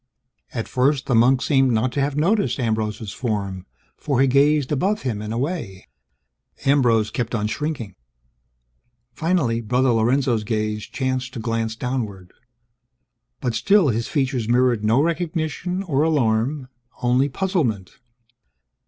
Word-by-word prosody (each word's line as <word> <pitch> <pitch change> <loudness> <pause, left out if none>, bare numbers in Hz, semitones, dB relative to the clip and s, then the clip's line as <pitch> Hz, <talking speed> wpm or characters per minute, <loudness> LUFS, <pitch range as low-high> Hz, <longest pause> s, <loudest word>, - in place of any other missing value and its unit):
At 115 -3 -4
first, 135 +2 +1
the 135 - 0
monk 125 +3 +4
seemed 135 -4 +3
not 115 +3 +1
to 140 - -1
have 140 0 -1
noticed 195 +3 +1
Ambrose's 110 -3 -2
form, 100 -6 -3 0.3
for 140 -4 -1
he 135 - +5
gazed 140 +1 +3
above 195 +9 0
him 115 -6 -2
and 105 0 -5
away. 115 - -4 0.8
Ambrose 120 -6 +3
kept 120 0 -2
on 105 -1 -1
shrinking. 125 -3 -3 1.2
Finally, 150 -7 0
Brother 125 +4 +1
Lorenzo's 120 0 +1
gaze 105 -1 -2
chanced 130 -1 -3
to - - -4
glance 115 -1 -2
downward. 110 -7 -4 1.1
But 120 - -1
still, 195 - +3
his 115 0 -1
features 130 -6 -1
mirrored 120 -2 +2
no 115 +6 +3
recognition 170 +2 -2
or 145 -7 0
alarm; 135 -2 +1 0.3
only 125 +3 +2
puzzlement. 140 - -2
125 Hz, 130 wpm, -22 LUFS, 110-145 Hz, 1.2 s, he